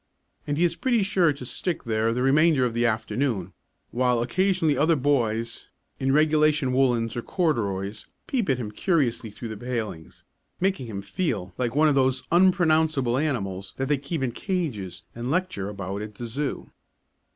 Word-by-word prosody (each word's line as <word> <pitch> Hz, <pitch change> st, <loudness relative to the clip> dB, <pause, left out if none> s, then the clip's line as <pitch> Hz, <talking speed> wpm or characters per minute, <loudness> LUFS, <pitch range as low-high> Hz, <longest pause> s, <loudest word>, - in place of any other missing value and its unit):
And 145 Hz, 0 st, -1 dB
he 170 Hz, -, +2 dB
is 170 Hz, -1 st, +2 dB
pretty 240 Hz, -2 st, +1 dB
sure 185 Hz, -5 st, +3 dB
to 140 Hz, -3 st, -7 dB
stick 175 Hz, +7 st, -2 dB
there 110 Hz, 0 st, +1 dB
the 125 Hz, +2 st, -1 dB
remainder 145 Hz, 0 st, +4 dB
of 120 Hz, -, -1 dB
the 120 Hz, +1 st, +2 dB
afternoon, 110 Hz, -4 st, -1 dB, 0.4 s
while 125 Hz, -1 st, +2 dB
occasionally 170 Hz, +4 st, +1 dB
other 160 Hz, +5 st, +3 dB
boys, 115 Hz, -5 st, 0 dB, 0.3 s
in 135 Hz, 0 st, +1 dB
regulation 150 Hz, -2 st, +3 dB
woollens 120 Hz, -4 st, +2 dB
or 120 Hz, -, -2 dB
corduroys, 110 Hz, -, -1 dB, 0.2 s
peep 240 Hz, -, -1 dB
at 135 Hz, -, +3 dB
him 110 Hz, -4 st, -5 dB
curiously 125 Hz, -, 0 dB
through 115 Hz, +3 st, -8 dB
the 110 Hz, -, -6 dB
palings, 110 Hz, -8 st, -5 dB, 0.4 s
making 190 Hz, -9 st, 0 dB
him 100 Hz, -3 st, -5 dB
feel 100 Hz, -, -2 dB
like 125 Hz, 0 st, -2 dB
one 155 Hz, +1 st, +5 dB
of 150 Hz, -, +4 dB
those 130 Hz, -1 st, +2 dB
unpronounceable 160 Hz, -8 st, +3 dB
animals 100 Hz, -10 st, -2 dB
that 135 Hz, 0 st, -2 dB
they 145 Hz, -, +3 dB
keep 140 Hz, +1 st, -3 dB
in 125 Hz, -, 0 dB
cages 125 Hz, -, -3 dB
and 120 Hz, +2 st, -5 dB
lecture 155 Hz, -, -1 dB
about 100 Hz, 0 st, -5 dB
at 105 Hz, 0 st, -7 dB
the 120 Hz, -, -6 dB
zoo. 135 Hz, +5 st, -4 dB
130 Hz, 170 wpm, -25 LUFS, 115-155 Hz, 0.4 s, one